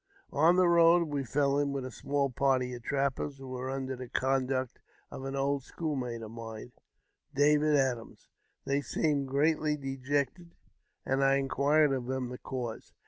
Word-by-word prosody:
On 160 +5 +5
the 185 -1 +4
road 170 -1 +5
we 145 -2 -1
fell 140 +2 +1
in 140 -1 0
with 135 -2 -3
a 130 - -6
small 140 -1 -1
party 125 -1 +1
trap]Ders, 140 +2 -1
who 135 -1 -10
were 130 0 -4
under 135 0 -3
the 125 -1 -8
conduct 130 -1 0 0.3
of 135 - -7
an 135 0 -4
old 140 0 0
schoolmate 130 -6 -4
mine, 110 +1 -8 0.6
David 150 +1 +4
Adams. 130 -5 -1 0.4
They 140 +1 +1
seemed 145 -1 0
greatly 150 +2 +1
dejected, 140 +5 -3 0.5
and 135 +1 +1
inquired 140 +2 +3
of 125 -2 -3
them 130 -1 -2
the 125 - -7
cause. 120 -4 -6
135 Hz, 150 wpm, -30 LUFS, 130-145 Hz, 0.6 s, On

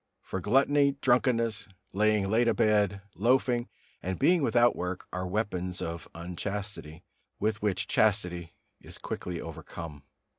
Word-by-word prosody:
For 95 - -4
gluttony, 140 +6 +3
drunkenness, 120 -4 +2 0.3
lying 105 0 +2
late 115 +4 +3
abed, 105 -3 +2
loafing 120 +4 +2 0.3
and 95 +1 -3
being 170 +5 +4
without 120 -3 +4
work 90 +1 -4
are 90 0 -2
weapons 90 -2 -2
of 85 0 -5
unchastity, 90 -1 -5 0.4
with 110 +1 0
which 100 -2 0
chastity 90 -6 +1 0.2
is - - -9
quickly 90 -2 -5
overcome. 80 -2 -8
105 Hz, 120 wpm, -29 LUFS, 90-115 Hz, 0.4 s, being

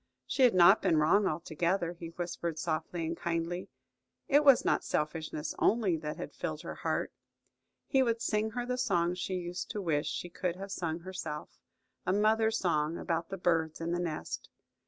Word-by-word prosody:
She - - -2
had 245 -6 +6
not 185 +4 +7
been 170 -5 +3
wrong 190 +7 +4
altogether, 170 +3 -1
he 170 -1 -8
whispered 170 -1 -4
softly 165 +1 -2
and 165 +1 -2
kindly. 170 +1 -2 0.6
It 290 +1 +5
was 275 -4 +6
not - - +2
selfishness 155 0 -2
only 210 -6 +3
that 150 -1 -5
had 145 - -6
filled 155 -3 -4
her - - -5
heart. - - -2 0.7
He 270 - +3
would 230 -3 +1
sing 215 -1 0
her 245 - -1
the 250 0 -2
song 175 -8 +2
she 185 +1 -3
used 175 0 -4
to 210 - -3
wish 160 -6 0
she - - -3
could 175 0 -3
have 195 +1 -7
sung 170 -3 -3
herself–a 155 - -6
mother's 220 +2 +3
song 160 -3 0
about 165 0 -2
the 195 - -4
birds 165 -3 +1
in 165 +1 -2
the 175 - 0
nest. 165 -3 -4
175 Hz, 175 wpm, -31 LUFS, 160-195 Hz, 0.7 s, not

